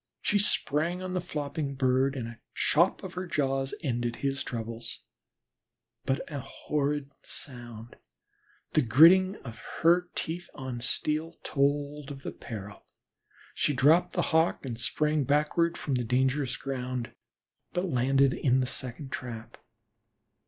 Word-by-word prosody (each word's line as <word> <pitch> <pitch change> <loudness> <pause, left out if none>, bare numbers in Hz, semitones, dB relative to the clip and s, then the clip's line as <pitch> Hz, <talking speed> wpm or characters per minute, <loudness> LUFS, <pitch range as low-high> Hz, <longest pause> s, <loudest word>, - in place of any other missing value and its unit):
She 205 - +2
sprang 175 -2 +1
on 185 0 -4
the 180 - 0
flopping 145 -3 -3
bird 130 +1 +2
and 120 -4 -3
a 115 -1 -10 0.2
chop 170 +7 +3
of 190 - -6
her 185 0 -4
jaws 135 -4 0
ended 120 -3 -1
his 140 +1 -1
troubles, 115 -1 -5 1.0
but 135 +1 +1
a 145 - -2
horrid 145 +1 -2
sound 120 -3 -9 0.7
the 155 - +4
gritting 170 - +7
of 115 -3 -8 0.2
her 175 +2 +5
teeth 175 +2 -3
on 130 -3 -5
steel 155 +6 0
told 145 0 0
her 145 - -5
of - - -13
peril. 105 -3 -8 0.7
She 145 - +1
dropped 155 +7 +4
the 175 - +1
Hawk 160 -2 +3
and 115 -3 -4
sprang 150 +3 +1
backward 150 +5 +2
from 140 - -2
the 125 -1 +1
dangerous 130 +2 +1
ground, 125 -3 -4 0.6
but 180 +1 -1
landed 135 -3 +3
in 130 -1 +2
the 130 - +2
second 130 +2 -6
trap. 115 -2 -6
140 Hz, 140 wpm, -29 LUFS, 125-155 Hz, 1.0 s, gritting